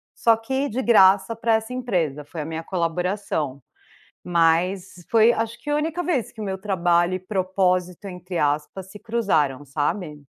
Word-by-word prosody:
só 230 -1 +4
que 265 +5 -2
de 250 +4 -2
graça 200 -2 +5
pra 230 0 +1
essa 220 +3 -3
empresa, 170 - -2
foi 160 0 -7
a - - -5
minha 160 0 -5
colaboração. 170 -5 -2 0.6
Mas 175 +3 +1 0.2
foi, 225 +1 +5
acho, 225 +1 -3
que - - -23
a 295 - +2
única 320 +3 -1
vez 295 -9 -1
que 220 - -16
o - - -3
meu 190 -1 -2
trabalho 175 -2 +1
e - - -3
"propósito" 185 -1 -1
entre 180 -1 -6
aspas 150 +6 -1
se 210 - -11
cruzaram, 160 - 0
sabe. 150 +2 -3
190 Hz, 170 wpm, -23 LUFS, 165-225 Hz, 0.6 s, graça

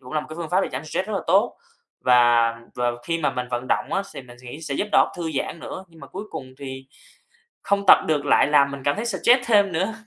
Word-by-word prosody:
cũng 125 +2 -12
là 155 - 0
một - - -10
cái 155 - -9
phương 170 -2 -5
pháp 185 +2 +3
để - - -1
giảm 135 +5 -5
stress 185 +5 -3
rất 215 - -4
là 195 - -1
tốt. 195 +7 +2 0.4
Và 120 -2 +4 0.2
và 120 0 0 0.2
khi 165 0 -1
mà 155 - 0
mình 125 -1 -4
vận 120 +1 -3
động - - -1
á 195 - 0
thì - - -7
mình 120 -1 -15
nghĩ 125 +5 -9
sẽ 145 -3 -4
giúp 210 - -2
đầu - - +6
óc - - -9
thư 170 -2 -3
giãn - - -4
nữa, 185 - -7
nhưng 165 -1 -19
mà - - -10
cuối 195 +3 -7
cùng 130 -1 -8
thì 130 -1 -8 0.8
không 200 0 0
tập - - +10
được 150 -2 0
lại 140 - +4
làm 140 -1 +4
mình 140 -1 -7
cảm 145 - +2
thấy 220 - -4
stress 240 +3 +3
thêm 205 -4 +4
nữa. 190 +7 -1
155 Hz, 275 wpm, -23 LUFS, 130-190 Hz, 0.8 s, tập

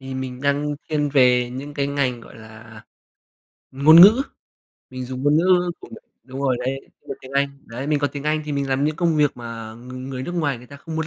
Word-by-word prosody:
Thì 135 0 -7
mình 130 -1 -5
đang 145 +1 0
thiên 150 -2 0
về 125 -3 +4
những 140 +3 -7
cái 140 -1 -1
ngành, 140 -4 -1
gọi - - -14
là, 110 0 -13 0.9
ngôn 150 +5 +7
ngữ, 215 +8 +8 0.7
mình 130 0 -6
dùng 130 +1 -6
ngôn 145 +1 +3
ngữ 180 +1 +3
của - - -12
m - - -9 0.3
đúng 130 +1 -8
rồi 130 -3 +1
đấy, 130 +2 -3 0.3
dùng - - -5
tiếng 130 - -12
Anh. 140 0 -1
Đấy, 120 +4 -6
mình 150 0 +1
có 145 - 0
tiếng 145 0 -6
Anh 155 0 0
thì 150 - -5
mình 140 -1 -2
làm 135 +1 0
những 155 0 -1
công 165 -2 +1
việc 150 -2 +2
mà 115 -2 -8
ng 125 +2 -9
người 130 -1 -5
nước 175 - -5
ngoài 145 -7 -1
người 125 - -15
ta 140 - -12
không 160 +3 -8
muốn 160 -1 -2
140 Hz, 240 wpm, -22 LUFS, 125-150 Hz, 0.9 s, ngữ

